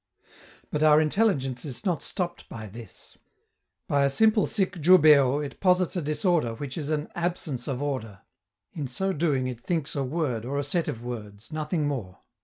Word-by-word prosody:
But 150 - -1
our 155 -1 +6
intelligence 150 - +1
is 145 +7 -6
not 175 -6 0
stopped 175 -3 -3
by 110 -1 -7
this. 110 0 -11 0.7
By 140 -1 +2
a 140 - +3
simple 215 +7 +3
sic 195 -1 -1
jubeo 150 -4 +6
it 140 - -9
posits 185 -1 +2
a 180 - 0
disorder 150 - +1
which 135 +2 -6
is 150 -3 -4
an 155 0 -1
"absence 170 -7 -3
of 135 -1 -2
order." 115 -9 -4 0.5
In 150 -5 -4
so 190 +10 -1
doing 145 -5 +1
it 125 -2 -4
thinks 160 0 -1
a 140 - 0
word 130 -5 -2
or 135 +4 -3
a 145 - 0
set 165 +4 -1
of 115 - -4
words, 110 -1 -8
nothing 155 0 -1
more. 115 -11 -4
145 Hz, 180 wpm, -26 LUFS, 125-170 Hz, 0.7 s, our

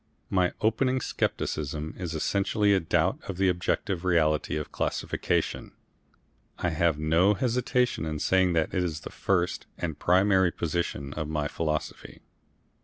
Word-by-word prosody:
My 90 -2 +2
opening 130 +4 +2
scepticism 75 - -2
is 85 -3 -5
essentially 100 +5 +1
a 95 - +4
doubt 80 - +1
of 95 - -4
the 95 0 +3
objective 90 +1 -1
reality 80 -4 +2
of 75 - -5
classification. - - -2 0.8
I 90 - 0
have 85 -1 +1
no 80 +7 +3
hesitation 125 -3 0
in 80 -1 -3
saying 95 +3 +2
that 80 -2 0
is 85 -4 -1
the - - -8
first 90 -2 -1
and 80 -4 -4
primary 95 0 +4
proposition 75 -5 -3
of 80 -1 -3
my 75 -1 -1
philosophy. 75 0 -4
90 Hz, 135 wpm, -27 LUFS, 80-95 Hz, 0.8 s, a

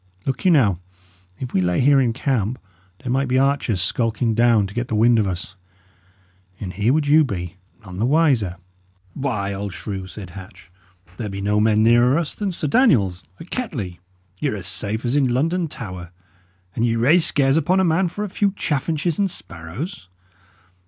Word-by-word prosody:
Look 135 - -3
you, - - +6
now, 115 - +4 0.6
if 125 - -6
we 95 - +2
lay 90 -1 +1
here 135 +1 +5
in 120 -3 +2
camp, 125 -2 -1 0.5
there 125 - -3
might 135 +1 +1
be 125 +1 +1
archers 135 -8 +1
skulking 115 +3 0
down 115 -2 +4
to 95 - -8
get 120 +2 -2
the 110 - -2
wind 115 +2 +4
of 105 - +1
us; 90 +1 -5 1.0
and 90 -3 -5
here 105 +6 +1
would 150 +1 +2
you 155 +2 +5
be, 95 - -5 0.3
none 90 -1 -8
the 115 - +2
wiser!" 135 - +2 0.6
"Why, 105 -8 -2
old 100 -1 -5
shrew," 95 +1 -6
said 95 -1 -9
Hatch, 90 0 -12 0.5
"there 110 -3 -4
be 100 0 -6
no 105 +1 +1
men 110 0 +3
nearer 120 +4 +5
us 165 -3 -2
than 205 -2 -3
Sir 165 -3 -3
Daniel's, 115 - +3 0.2
at 170 - -12
Kettley; 115 - -4 0.4
y' - - +1
are - - -1
as - - -7
safe 110 +4 -3
as 120 +3 0
in 135 -4 +2
London 165 +7 0
Tower; 90 - -8 0.7
and 115 - 0
ye 115 -1 +2
raise 145 +10 +4
scares 135 -1 +2
upon 170 +4 +2
a - - +3
man 175 +2 +2
for 205 +5 -5
a - - -2
few 200 +1 0
chaffinches 155 +3 -1
and 200 -1 +2
sparrows!" 90 - -7
120 Hz, 190 wpm, -21 LUFS, 100-145 Hz, 1.0 s, you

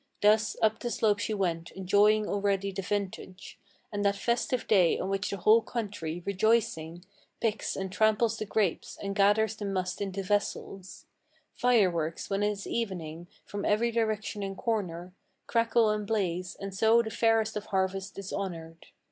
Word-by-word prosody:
Thus 215 +1 +4
up 220 0 +3
the 240 - -3
slope 210 -3 +1
she 215 - -1
went, 170 -4 -1
enjoying 205 +3 +3
already 200 -1 0
the 195 0 -4
vintage, 190 -1 -5 0.3
And 205 0 -1
that 200 0 +2
festive 235 +3 -1
day 185 -6 +4
on 190 - -3
which 195 +1 -1
the 200 - -3
whole 215 +5 +5
country, 195 -8 -4
rejoicing, 190 -5 0 0.3
Picks 220 -2 -1
and 190 -1 -4
tramples 220 +2 +2
the 215 - -3
grapes, 205 -5 -1
and 200 0 -2
gathers 210 +2 +3
the 210 - -6
must 185 -2 -2
into 195 -1 -3
vessels: 195 -1 -3 0.5
Fireworks, 185 -10 +1
when 195 +1 0
it 205 - +2
is 200 -1 -5
evening, 175 -7 -4 0.2
from 205 0 -5
every 230 +3 +2
direction 215 -2 -1
and 195 -1 -4
corner 185 -6 -2 0.3
Crackle 230 -1 +3
and 210 -1 -2
blaze, 185 -4 -1
and 195 0 -6
so 225 +4 +4
the 220 - -5
fairest 225 -1 +2
of 210 0 -4
harvests 190 0 -2
is 195 -1 -6
honored. 165 -4 -6
200 Hz, 165 wpm, -29 LUFS, 190-220 Hz, 0.5 s, whole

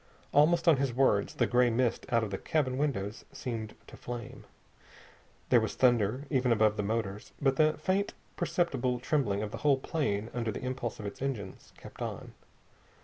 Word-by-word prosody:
Almost 165 +4 +4
on 160 -4 +7
his 135 -3 -1
words 125 -6 +2
the - - +2
gray 125 0 +3
mist 120 0 0
out 115 -3 +2
the 95 - -3
cabin 135 -5 0
windows 110 -7 -2
seemed 115 -5 -5
to - - -13
flame. 120 -2 -7 1.0
There - - +6
was - - -3
thunder 120 +1 +2
even 130 -3 +2
above 110 -1 +4
the 105 - -1
motors. 105 -1 -3
But 135 -1 +2
the 155 0 +4
faint, 190 +5 0 0.2
perceptible 130 -8 0
trembling 120 -6 0
of 105 - -4
the - - -5
whole 145 -2 +3
plane 120 -7 -2
under 115 -2 -1
the 105 - -6
impulse 125 -3 -3
of 105 - -6
its 100 - -7
engines 115 -9 -5
kept - - -12
on. - - -5
125 Hz, 175 wpm, -30 LUFS, 110-140 Hz, 1.0 s, on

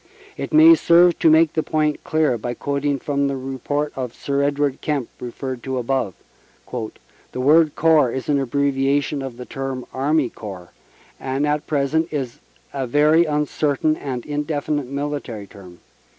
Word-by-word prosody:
It - - -5
may 315 +2 +8
serve 175 - +4
to 160 - +5
make 160 0 +5
the 160 - +1
point 155 -1 -1
clear 155 -5 +1
by 120 +2 -4
quoting 140 +1 -1
from 140 +1 -1
the 140 -1 -2
report 135 +3 -3
of 125 -3 -5
Sir 140 0 -1
Edward 140 -1 0
Kemp 140 -6 -2
referred 125 +1 -6
to 130 +1 -3
above. 125 -5 -1 0.6
"The 120 +1 -8
word 150 +3 +4
Corps 155 -6 +4
is 130 +1 -5
an 145 -1 +2
abbreviation 140 +2 0
of 130 -3 -6
the 125 - -8
term 135 -1 -5
Army 140 -1 +1
Corps, 95 -5 -9 0.5
and 135 +2 -1
at 150 0 -1
present 155 +3 0
is 135 -6 -4 0.3
a 135 -2 -2
very 150 +6 +4
uncertain 150 0 0
and 130 -5 -5
indefinite 145 -1 -2
military 140 -6 -4
term. 90 -3 -14
140 Hz, 155 wpm, -21 LUFS, 130-150 Hz, 0.6 s, may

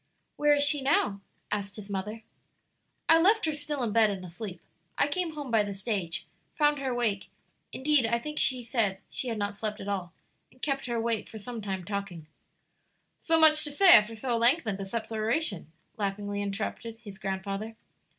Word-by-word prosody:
"Where 295 0 +4
is 285 - +4
she 290 0 +4
now?" 210 -8 +1 0.3
asked 200 -1 -3
his 210 -2 -9
mother. 210 +3 -5 0.8
"I 325 - +7
left 415 +5 +4
her 315 - 0
still 295 -2 -3
in 225 - -1
bed 225 -1 +5
and 190 -2 -5
asleep. 180 +1 -7 0.4
I - - +3
came 335 +2 -2
home 290 -4 -6
by 225 -2 +4
the 205 -1 -3
stage, 195 -4 -2 0.3
found 295 -1 +2
her 270 -1 -2
awake 235 -5 -1 0.4
indeed, 275 -3 +2
I 235 +1 +1
think 300 +5 -5
she 255 -2 +3
said 225 -5 +1
she 260 - -3
had 230 -2 -2
not 205 0 -2
slept 210 +1 -4
at 195 - -7
all 190 -4 -3 0.4
and 255 - -24
kept 275 -1 -2
her 240 - -2
awake 230 -2 -1
for 220 - -9
some 230 +2 -7
time 190 -3 -4
talking 200 -5 -5 0.5
" - - -46
"So 325 -1 +3
much 310 -1 +6
to 295 - +1
say 375 +6 +5
after 225 -8 +8
so 240 +2 -2
lengthened 235 - +2
a 195 - -4
separation?" 220 - -2 0.3
laughingly 205 0 -3
interrupted 215 +3 -4
his 205 -4 -12
grandfather. 195 +3 -4
225 Hz, 190 wpm, -28 LUFS, 200-275 Hz, 0.8 s, after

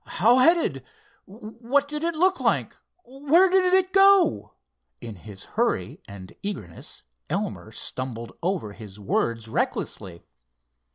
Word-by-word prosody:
"How 235 +6 +5
headed? 255 - +3 0.4
What 230 +7 -2
did 300 +1 -5
it 335 0 -1
look 370 +4 +2
like? - - 0 0.3
Where 290 +8 +2
did 370 -1 +3
it 375 0 +2
go?" 390 - +4 0.4
In 115 - -8
his 100 +1 -12
hurry - - -2
and 95 -2 -11
eagerness 105 - -7 0.3
Elmer - - -4
stumbled 120 -3 -6
over 170 - -2
his 105 -2 -12
words 115 +3 -2
recklessly. 90 -5 -4
215 Hz, 120 wpm, -24 LUFS, -, 0.4 s, How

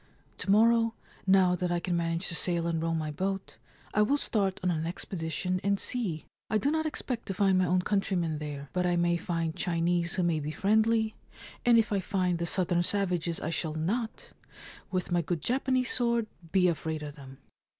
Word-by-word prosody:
To - - -5
morrow, 230 +2 +4 0.3
now 190 -2 +5
that 180 0 -2
I 175 - +1
can 175 0 -1
manage 165 +1 0
to 170 - -2
sail 170 -1 0
and 165 -1 0
row 165 0 0
my 155 -1 -2
boat, 190 - -3 0.4
I 210 - +3
will 275 +7 +3
start 200 -8 0
on 180 - +2
an 160 -1 -1
expedition 180 0 -3
and 200 0 +1
see. 195 -11 -2 0.2
I 215 - +2
do 275 +6 +1
not 315 0 0
expect 250 -5 -4
to 195 - -3
find 190 -1 +3
my 185 - +2
own 180 +1 +2
countrymen 180 -6 0
there; 145 -2 -6
but 180 0 +1
I 175 - +2
may 175 0 +2
find 165 -2 -2
Chinese 170 0 0
who 185 - +1
may 170 -2 +1
be 150 0 -4
friendly, 220 +6 +2 0.5
and 235 -1 +7
if 220 -2 +2
I 200 - +2
find 180 -2 0
the 170 - -1
southern 175 -1 +1
savages 175 -3 0
I 160 - -2
shall 160 -2 -2
not, 220 +9 -2 0.6
with 185 -1 -2
my 175 0 +3
good 170 -1 -3
Japanese 255 0 +1
sword, 235 -2 +1 0.3
be 185 -1 +4
afraid 160 -2 -2
of 145 -1 -7
them 135 -2 -12
180 Hz, 200 wpm, -29 LUFS, 165-205 Hz, 0.6 s, and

